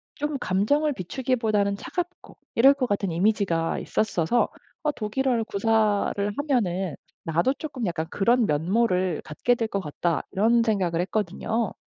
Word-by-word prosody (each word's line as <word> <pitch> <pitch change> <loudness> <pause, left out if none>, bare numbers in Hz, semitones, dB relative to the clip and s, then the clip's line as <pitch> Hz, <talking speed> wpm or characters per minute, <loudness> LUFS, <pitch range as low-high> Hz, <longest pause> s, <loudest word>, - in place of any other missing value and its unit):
좀 295 -1 -2
감정을 285 +12 +1
비추기보다는 215 -1 0
차갑고 355 - -6 0.2
이럴 270 +4 +7
것 260 -3 -1
같은 200 -2 -1
이미지가 175 -2 +1
있었어서 215 +1 +1 0.4
어 300 - +2
독일어를 245 0 -1
구사를 210 -1 +1
하면은 195 - 0 0.3
나도 170 - +2
쪼끔 280 -7 -5
약간 170 -2 -2
그런 235 +3 +2
면모를 180 +2 +1
갖게 240 +11 0
될 230 -2 -1
것 200 - -2
같다. 165 +2 -1
이런 225 +4 +3
생각을 185 -7 0
했거든요. 215 +3 -1
215 Hz, 320 characters per minute, -25 LUFS, 185-245 Hz, 0.4 s, 이럴